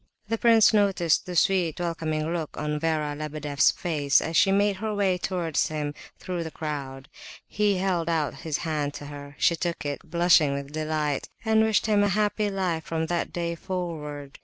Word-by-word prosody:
The 225 Hz, -, 0 dB
prince 225 Hz, -2 st, +6 dB
noticed 195 Hz, -7 st, +2 dB
the 180 Hz, -, -5 dB
sweet, 175 Hz, -2 st, +2 dB
welcoming 160 Hz, -2 st, -2 dB
look 165 Hz, -3 st, -4 dB
on 150 Hz, 0 st, -2 dB
Vera 155 Hz, -2 st, -1 dB
Lebedeff's 150 Hz, -1 st, +1 dB
face, 145 Hz, -5 st, +1 dB
as 160 Hz, -, -4 dB
she 195 Hz, -, +5 dB
made 200 Hz, 0 st, +2 dB
her 215 Hz, +1 st, -3 dB
way 190 Hz, -3 st, +1 dB
towards 175 Hz, -5 st, 0 dB
him 150 Hz, -1 st, -3 dB, 0.2 s
through 180 Hz, -2 st, -4 dB
the 160 Hz, -, -5 dB
crowd. 140 Hz, -4 st, -6 dB, 0.4 s
He 205 Hz, -2 st, +1 dB
held 180 Hz, -3 st, 0 dB
out 160 Hz, -3 st, 0 dB
his 155 Hz, -3 st, -2 dB
hand 150 Hz, -3 st, -2 dB
to 145 Hz, -, -7 dB
her. 145 Hz, 0 st, -9 dB
She 170 Hz, -, +3 dB
took 170 Hz, -3 st, -3 dB
it, 145 Hz, -1 st, -3 dB
blushing 170 Hz, -4 st, +3 dB
with 140 Hz, 0 st, -6 dB
delight, 155 Hz, -2 st, -2 dB, 0.2 s
and 220 Hz, 0 st, +4 dB
wished 220 Hz, -1 st, +2 dB
him 210 Hz, -2 st, +3 dB
"a -, -, +3 dB
happy 210 Hz, +1 st, +1 dB
life 185 Hz, -5 st, -1 dB
from 160 Hz, 0 st, -2 dB
that 170 Hz, +1 st, -2 dB
day 170 Hz, -1 st, -2 dB
forward." 155 Hz, -6 st, -5 dB
165 Hz, 185 wpm, -26 LUFS, 150-190 Hz, 0.4 s, prince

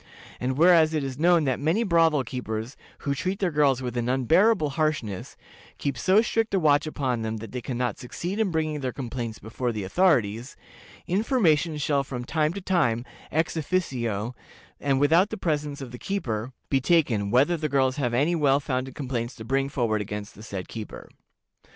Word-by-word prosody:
And 130 Hz, +1 st, -2 dB
whereas 165 Hz, -1 st, +5 dB
it 150 Hz, -, 0 dB
is 135 Hz, 0 st, -5 dB
known 170 Hz, 0 st, +4 dB
that 130 Hz, -3 st, 0 dB
many 165 Hz, +10 st, +1 dB
brothel 165 Hz, -, +3 dB
keepers, 115 Hz, 0 st, -5 dB, 0.3 s
who 140 Hz, -, -1 dB
treat 185 Hz, +8 st, -2 dB
their 190 Hz, -3 st, 0 dB
girls 140 Hz, -4 st, +2 dB
with 125 Hz, -1 st, -4 dB
an 120 Hz, 0 st, -1 dB
unbearable 155 Hz, -, +3 dB
harshness, 135 Hz, -, -2 dB, 0.4 s
keep 140 Hz, -2 st, -2 dB
so 190 Hz, -, +4 dB
strict 225 Hz, -2 st, 0 dB
a -, -, +3 dB
watch 150 Hz, -2 st, +3 dB
upon 130 Hz, -6 st, -1 dB
them 110 Hz, 0 st, -3 dB
that 110 Hz, -1 st, -8 dB
they 125 Hz, -, -4 dB
can 120 Hz, +1 st, -4 dB
not 125 Hz, -4 st, -1 dB
succeed 175 Hz, -, -5 dB
in 220 Hz, -3 st, +2 dB
bringing 155 Hz, -2 st, -1 dB
their 130 Hz, -2 st, -2 dB
complaints 120 Hz, -4 st, -5 dB
before 120 Hz, +2 st, -3 dB
the 105 Hz, -3 st, -4 dB
authorities, 120 Hz, -, +1 dB, 0.5 s
information 180 Hz, -, +2 dB
shall 140 Hz, -1 st, +1 dB
from 125 Hz, -2 st, -6 dB
time 155 Hz, +1 st, +1 dB
to 200 Hz, -, -6 dB
time, 140 Hz, -11 st, +1 dB, 0.3 s
ex 160 Hz, +3 st, 0 dB
officio, 125 Hz, -, -1 dB, 0.5 s
and 135 Hz, -2 st, +1 dB
without 165 Hz, +7 st, +4 dB
the 220 Hz, -, -5 dB
presence 150 Hz, -4 st, -2 dB
of 130 Hz, -3 st, -7 dB
the 125 Hz, -, -9 dB
keeper, 125 Hz, -, -3 dB, 0.2 s
be 135 Hz, -1 st, +3 dB
taken, 125 Hz, -10 st, +2 dB
whether 135 Hz, +10 st, +3 dB
the 155 Hz, -2 st, -2 dB
girls 130 Hz, -1 st, +2 dB
have 125 Hz, -5 st, 0 dB
any 145 Hz, +7 st, +2 dB
well 145 Hz, -4 st, +3 dB
founded 130 Hz, -2 st, -3 dB
complaints 125 Hz, -3 st, -3 dB
to 110 Hz, -, -9 dB
bring 135 Hz, +3 st, 0 dB
forward 115 Hz, -6 st, 0 dB
against 105 Hz, 0 st, -6 dB
the -, -, -14 dB
said 100 Hz, -4 st, -6 dB
keeper. 110 Hz, -2 st, -8 dB
140 Hz, 190 wpm, -26 LUFS, 120-160 Hz, 0.5 s, whereas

